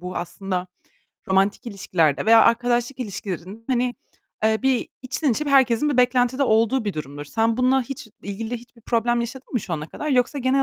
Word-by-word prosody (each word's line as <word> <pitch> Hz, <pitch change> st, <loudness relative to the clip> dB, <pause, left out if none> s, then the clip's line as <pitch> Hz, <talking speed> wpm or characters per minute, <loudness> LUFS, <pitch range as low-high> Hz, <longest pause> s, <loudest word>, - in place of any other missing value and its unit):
bu 180 Hz, +1 st, -6 dB
aslında 180 Hz, +1 st, -3 dB, 0.6 s
romantik 195 Hz, +4 st, +1 dB
ilişkilerde 180 Hz, -8 st, 0 dB
veya 225 Hz, 0 st, +8 dB
arkadaşlık 240 Hz, +2 st, +2 dB
ilişkilerin 200 Hz, -2 st, -6 dB
hani, 250 Hz, -1 st, +1 dB, 0.5 s
eee, 220 Hz, 0 st, +3 dB
bir 265 Hz, -2 st, +1 dB
içten 265 Hz, +3 st, -1 dB
içe 300 Hz, -, -2 dB
bir -, -, -1 dB
herkesin 265 Hz, 0 st, +4 dB
bir 280 Hz, -, -1 dB
beklentide 250 Hz, +1 st, +3 dB
olduğu 230 Hz, 0 st, +2 dB
bir 205 Hz, -, -1 dB
durumdur. 145 Hz, -2 st, -6 dB
Sen 225 Hz, +8 st, 0 dB
bununla 255 Hz, +1 st, +3 dB
hiç 270 Hz, 0 st, -8 dB
ilgili 220 Hz, +4 st, -4 dB
hiçbir 235 Hz, 0 st, -16 dB
problem 235 Hz, +1 st, +1 dB
yaşadın 250 Hz, +3 st, -7 dB
mı 245 Hz, -, +1 dB
şu 185 Hz, -, -7 dB
ana 150 Hz, -2 st, -3 dB
kadar? 300 Hz, -, -5 dB
Yoksa 255 Hz, +1 st, +1 dB
genel 265 Hz, +1 st, +2 dB
235 Hz, 180 wpm, -23 LUFS, 200-255 Hz, 0.6 s, veya